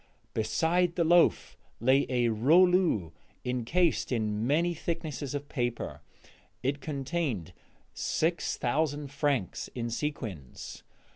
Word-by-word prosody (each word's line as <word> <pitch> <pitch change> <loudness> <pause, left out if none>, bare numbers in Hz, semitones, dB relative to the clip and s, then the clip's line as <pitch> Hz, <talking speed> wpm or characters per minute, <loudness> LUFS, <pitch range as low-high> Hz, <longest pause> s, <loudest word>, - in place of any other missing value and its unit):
Beside 170 +10 +1
the 170 - +2
loaf 160 - +4 0.2
lay 130 +4 +3
a 120 -2 +2
rouleau 155 - +4 0.3
incased 125 +9 +1
in 110 -1 0
many 170 +5 +2
thicknesses 155 -4 -4
of 145 0 -4
paper; 120 -5 -3 0.6
it 140 +2 -1
contained 135 - -2 0.4
six 165 +2 0
thousand 145 +2 -1
francs 145 - -1
in 120 -1 -3
sequins. 110 - -5
140 Hz, 100 wpm, -29 LUFS, 115-160 Hz, 0.6 s, loaf